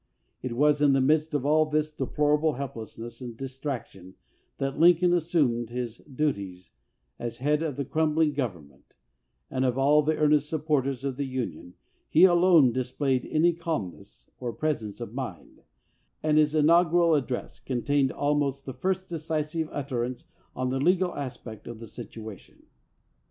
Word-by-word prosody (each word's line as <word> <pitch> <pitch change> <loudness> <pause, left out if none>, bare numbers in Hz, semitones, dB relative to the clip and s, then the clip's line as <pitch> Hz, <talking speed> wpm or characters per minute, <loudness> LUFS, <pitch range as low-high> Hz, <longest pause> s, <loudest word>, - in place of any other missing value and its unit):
It 130 -2 -4
was 145 +3 +3
in 145 -2 +5
the 135 - +3
midst 150 +3 +2
of 140 -2 -1
all 155 +1 +4
this 155 0 0
deplorable 150 +2 +1
help 140 -1 -5
lessness 115 +1 -9
and 120 -3 -7
distraction 130 -8 -6 0.4
that 135 +1 -3
Lincoln 175 +1 +5
assumed 150 -9 +1
his 120 -1 -4
duties 100 -11 -4 0.5
as 120 -1 -4
head 150 +4 +1
of 155 -4 -2
the 140 - -3
crumbling 155 +1 +1
government, 85 - -6 0.6
and 130 0 0
of 125 -1 +1
all 145 +3 +5
the 155 +1 +1
earnest 150 -1 +3
supporters 145 -4 -1
of 135 -2 -3
the 140 - -1
Union 115 -9 -5 0.3
he 165 - +5
alone 175 -7 +6
displayed 130 +1 -1
any 170 +3 +3
calmness 150 - -6
or 125 -2 -3
presence 115 -10 -3
of - - -6
mind, - - -7 0.6
and 155 0 +3
his 150 0 +2
inaugural 170 +2 +4
address 130 -4 -2
contained 135 +1 0
almost 145 -1 0
the 130 - -5
first 185 +8 -2
decisive 160 -1 -3
utterance 130 -3 -3 0.3
on 130 0 -1
the 135 - -1
legal 180 +4 +2
aspect 120 -5 -7
of 120 - -7
the 115 - -8
situation. 110 -1 -10
140 Hz, 150 wpm, -27 LUFS, 125-155 Hz, 0.6 s, alone